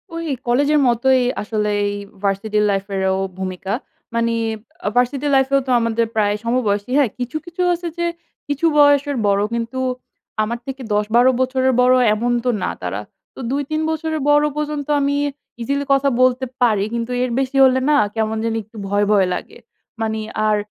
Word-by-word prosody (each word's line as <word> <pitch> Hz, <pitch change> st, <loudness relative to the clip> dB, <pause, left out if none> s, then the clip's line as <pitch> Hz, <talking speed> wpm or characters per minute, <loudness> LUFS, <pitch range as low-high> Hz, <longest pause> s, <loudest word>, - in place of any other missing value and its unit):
ওই 335 Hz, 0 st, -4 dB, 0.2 s
কলেজের 285 Hz, +5 st, +3 dB
মতোই 255 Hz, +2 st, +3 dB, 0.2 s
আসলে 210 Hz, 0 st, -1 dB, 0.2 s
এই 205 Hz, -, -1 dB, 0.3 s
ভার্সিটি 200 Hz, +2 st, 0 dB
লাইফেরও 195 Hz, -1 st, 0 dB, 0.2 s
ভূমিকা। 190 Hz, 0 st, -4 dB, 0.4 s
মানি 230 Hz, 0 st, +1 dB, 0.5 s
আ -, -, +3 dB
ভার্সিটি 255 Hz, +4 st, +1 dB
লাইফেও 270 Hz, +1 st, +3 dB
তো -, -, 0 dB
আমাদের 230 Hz, 0 st, +1 dB
প্রায় 205 Hz, -2 st, +2 dB
সমবয়সী। 230 Hz, -2 st, 0 dB
হ্যাঁ, 280 Hz, -5 st, +3 dB
কিছু, 250 Hz, +5 st, -3 dB
কিছু 345 Hz, +1 st, -5 dB
আছে 345 Hz, 0 st, -4 dB
যে 345 Hz, -, 0 dB, 0.4 s
কিছু 290 Hz, +3 st, -1 dB
বয়সের 285 Hz, -1 st, +4 dB
বড় 200 Hz, 0 st, +2 dB
কিন্তু 235 Hz, +2 st, -3 dB, 0.6 s
আমার 235 Hz, +2 st, -3 dB
থেকে 270 Hz, 0 st, -6 dB
১০-১২ 220 Hz, +5 st, +3 dB
বছরের 260 Hz, 0 st, +1 dB
বড় 250 Hz, +1 st, +5 dB, 0.2 s
এমন 235 Hz, +3 st, -1 dB
তো -, -, +2 dB
না -, -, 0 dB
তারা। 90 Hz, +3 st, -3 dB, 0.3 s
তো -, -, -11 dB
২-৩ 285 Hz, +3 st, -1 dB
বছরের 315 Hz, -1 st, -2 dB
বড় 295 Hz, 0 st, +5 dB
পর্যন্ত 300 Hz, -1 st, -3 dB
আমি 280 Hz, +1 st, +1 dB, 0.4 s
ইজিলি 280 Hz, +4 st, -1 dB
কথা 275 Hz, 0 st, +3 dB
বলতে 255 Hz, 0 st, +3 dB, 0.2 s
পারি। 215 Hz, -5 st, +3 dB
কিন্তু 235 Hz, +1 st, -3 dB
এর 255 Hz, -, -1 dB
বেশি 270 Hz, 0 st, -1 dB
হলে 260 Hz, 0 st, +3 dB
না 295 Hz, -, +5 dB, 0.2 s
কেমন 220 Hz, 0 st, -1 dB
জানি 225 Hz, 0 st, -1 dB
একটু 220 Hz, +2 st, -16 dB
ভয়, 205 Hz, +1 st, +1 dB
ভয় 195 Hz, -3 st, +4 dB
লাগে। -, -, -6 dB, 0.4 s
মানি 220 Hz, 0 st, -1 dB, 0.3 s
আর 210 Hz, -1 st, +3 dB
245 Hz, 165 wpm, -20 LUFS, 215-280 Hz, 0.6 s, বড়